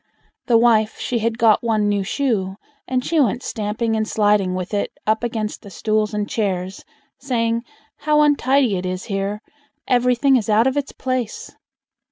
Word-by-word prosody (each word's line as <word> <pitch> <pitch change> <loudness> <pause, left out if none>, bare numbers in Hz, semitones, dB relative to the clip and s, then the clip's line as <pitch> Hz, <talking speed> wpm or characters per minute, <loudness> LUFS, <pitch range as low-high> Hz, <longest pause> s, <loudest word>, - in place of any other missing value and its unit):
The 235 - +5
wife 225 -2 +3
she 240 - -2
had 225 +1 -1
got 225 -2 +4
one 215 -3 +1
new 205 -1 +1
shoe, 195 -5 -1 0.3
and 255 -1 -1
she 330 - +1
went 250 -2 +1
stamping 220 +1 -2
and 220 0 -1
sliding 205 -4 +2
with 185 +2 -5
it 205 - -1
up 220 +2 +1
against 220 -3 -3
the 200 - -11
stools 215 +1 -1
and 210 -1 -2
chairs, 190 -4 -2 0.4
saying, 230 -3 0 0.4
"How 300 0 +2
untidy 275 -6 +3
it 180 - -4
is 185 0 -4
here! 200 +1 -3 0.5
Everything 250 +2 +3
is 225 -2 -3
out 215 +2 +4
of 265 +1 +1
its 285 -1 -2
place!" 255 -4 -4
220 Hz, 170 wpm, -20 LUFS, 205-250 Hz, 0.5 s, The